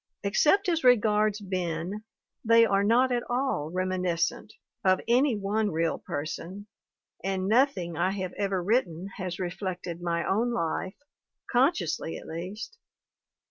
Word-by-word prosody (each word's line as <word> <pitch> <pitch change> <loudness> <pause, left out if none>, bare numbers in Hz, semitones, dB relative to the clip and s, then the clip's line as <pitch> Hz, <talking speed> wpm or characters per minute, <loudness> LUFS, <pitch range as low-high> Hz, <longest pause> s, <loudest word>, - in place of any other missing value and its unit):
Except 300 - +3
as 330 -2 +1
regards 215 -3 +4
Ben, 185 0 -3 0.4
they 230 0 +6
are 200 -2 +2
not 245 +5 +3
at 240 -1 +1
all 245 - -1
reminiscent 185 +2 -1 0.3
of 185 -1 +4
any 250 +2 +3
one 205 +2 0
real 165 -1 0
person, 170 +7 -5 0.6
and 190 -1 -1
nothing 210 - +2
I 175 +3 +1
have 185 -2 -4
ever 195 -3 -1
writ 230 +7 +3
ten 175 +3 -8
has 180 -2 -4
reflected 180 -1 -4
my 170 -1 -1
own 230 +5 +1
life, 185 -1 -2 0.6
consciously 230 - +1
at - - -11
least. 190 +9 -7
195 Hz, 135 wpm, -28 LUFS, 175-230 Hz, 0.6 s, they